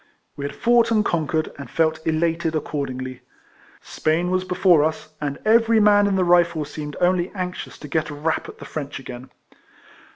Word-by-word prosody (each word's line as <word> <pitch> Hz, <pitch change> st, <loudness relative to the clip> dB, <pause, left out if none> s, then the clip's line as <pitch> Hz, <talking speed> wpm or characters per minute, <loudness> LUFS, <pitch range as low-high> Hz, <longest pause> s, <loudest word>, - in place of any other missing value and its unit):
We 140 Hz, -, -5 dB
had 140 Hz, -, -5 dB
fought 235 Hz, 0 st, +3 dB
and 215 Hz, -2 st, +2 dB
conquered, 160 Hz, -1 st, -1 dB
and 140 Hz, -, -8 dB
felt 160 Hz, -1 st, +1 dB
elated 165 Hz, 0 st, 0 dB
accordingly. 130 Hz, -4 st, -4 dB, 0.6 s
Spain 165 Hz, +3 st, -1 dB
was 185 Hz, 0 st, +1 dB
before 180 Hz, -3 st, +3 dB
us, 155 Hz, 0 st, -2 dB
and 145 Hz, -1 st, -2 dB
every 225 Hz, 0 st, +4 dB
man 205 Hz, -1 st, +5 dB
in 200 Hz, -, +1 dB
the 190 Hz, -, +2 dB
Rifles 170 Hz, -4 st, +2 dB
seemed 150 Hz, -1 st, -6 dB
only 180 Hz, 0 st, +2 dB
anxious 180 Hz, -1 st, -5 dB
to 150 Hz, -, -10 dB
get 155 Hz, +3 st, -1 dB
a 145 Hz, -, -6 dB
rap 155 Hz, +2 st, -2 dB
at -, -, -11 dB
the -, -, -10 dB
French 145 Hz, -2 st, -5 dB
again. 125 Hz, 0 st, -9 dB
160 Hz, 175 wpm, -22 LUFS, 150-185 Hz, 0.6 s, man